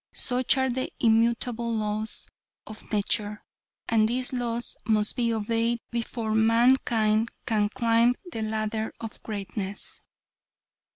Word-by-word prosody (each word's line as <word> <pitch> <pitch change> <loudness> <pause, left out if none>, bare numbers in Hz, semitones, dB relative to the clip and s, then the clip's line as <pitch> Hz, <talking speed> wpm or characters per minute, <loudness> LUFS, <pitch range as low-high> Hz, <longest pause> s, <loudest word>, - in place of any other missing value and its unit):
Such 250 +1 +3
are 265 -1 +2
the 260 +1 -2
immutable 235 +1 +2
laws 215 0 -3 0.4
of 215 0 -11
nature. 210 0 -1 0.4
And 220 -1 +3
these 250 +3 +1
laws 240 -1 -2
must 215 -1 +2
be 235 -2 +1
obeyed 230 +2 0
before 230 -1 -2
mankind 225 -1 +3 0.2
can 210 -2 +1
climb 235 0 +3 0.2
the 225 - -4
ladder 220 0 -2
of 225 -2 -8
greatness. 205 -1 -5
225 Hz, 115 wpm, -27 LUFS, 215-235 Hz, 0.4 s, Such